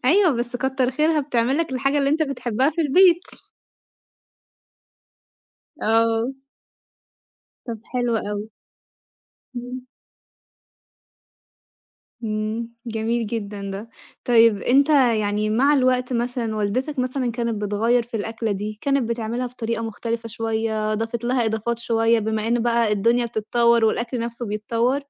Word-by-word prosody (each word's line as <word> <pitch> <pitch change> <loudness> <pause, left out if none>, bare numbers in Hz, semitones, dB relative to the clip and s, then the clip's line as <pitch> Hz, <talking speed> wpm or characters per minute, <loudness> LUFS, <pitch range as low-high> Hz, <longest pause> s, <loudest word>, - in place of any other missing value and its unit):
أيوه، 355 +6 +5
بس 240 +1 -3
كتّر 265 0 0
خيرها 305 +3 +2
بتعمل 260 -1 0
لك 330 -4 -1
الحاجة 275 +3 +1
اللي 275 0 +2
أنت 315 +2 +2
بتحبها 265 -1 0
في 335 - -3
البيت. 345 +4 +5 2.6
آه. 225 +3 +2 1.3
طَب 230 -3 -5
حلو 245 -2 -1
أوي. 210 0 -4 1.1
إمم. 250 +1 -5 2.4
إمم، 215 +2 -3
جميل 225 0 -1
جدًا 205 -3 -5
ده. 200 +4 -6 0.4
طيب 230 -3 +5
أنت 275 +4 +4
يعني 215 -6 +2
مع 265 +7 +3
الوقت 255 -2 +2
مثلًا 235 -2 -2
والدتك 255 +8 -1
مثلًا 255 0 -1
كانت 230 -3 -2
بتغيّر 225 +4 +2
في 235 0 -6
الأكلة 225 +1 -2
دي، 210 +2 -5
كانت 275 -4 +1
بتعملها 235 +2 -2
بطريقة 230 -2 -4
مختلفة 230 +1 -4
شوية، 220 -1 -1
ضافت 225 +2 -3
لها 245 0 +1
إضافات 220 +1 -1
شوية، 230 0 +2
بما 220 0 -1
إن 235 -1 +1
بقى 235 -2 +2
الدنيا 235 +4 +2
بتتطور 235 +1 +2
والأكل 235 +2 0
نَفْسه 235 +1 -4
بيتطور؟ 230 +5 0
235 Hz, 120 wpm, -22 LUFS, 220-255 Hz, 2.6 s, أيوه